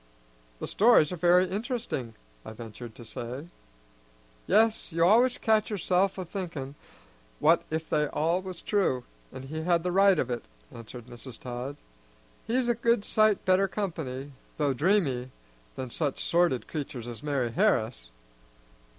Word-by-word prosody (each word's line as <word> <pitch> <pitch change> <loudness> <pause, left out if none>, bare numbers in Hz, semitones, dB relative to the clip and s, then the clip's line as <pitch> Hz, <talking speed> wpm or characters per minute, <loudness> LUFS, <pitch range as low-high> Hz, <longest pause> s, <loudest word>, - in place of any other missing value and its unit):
"The - - -5
stories 210 -8 +5
are - - -2
very 180 +2 +4
interesting," 205 - -3 0.3
I - - -8
ventured 115 0 -9
to 120 - -11
say. 125 +8 -7 1.0
"Yes, 220 0 +3
you 165 +1 +3
always 240 +6 +5
catch 220 -1 +2
yourself 195 -2 +1
a 185 - -4
thinkin' 165 -7 -5 0.6
what - - +4
if 160 0 -3
they 150 -1 +1
all 165 +5 0
was 185 -2 -8
true, 185 - +1 0.3
and 130 - -8
he 155 +3 -5
had 170 0 +2
the 180 - -1
right 195 0 +5
of 130 -4 -1
it," 120 - -3 0.3
answered 115 +1 -10
Mrs. 120 0 -11
Todd. 125 +3 -6 0.7
"He's 245 +2 +1
a 240 - +3
good 230 -2 +1
sight 215 -1 +3
better 190 +1 +4
company, 155 -9 -4 0.3
though 145 -3 +1
dreamy, 140 -5 +1 0.5
than 130 -2 -5
such 145 -1 -2
sordid 170 -7 +2
creatur's 140 -6 -5
as 120 0 -7
Mari' 140 -5 -1
Harris." - - +1
160 Hz, 150 wpm, -28 LUFS, 130-195 Hz, 1.0 s, stories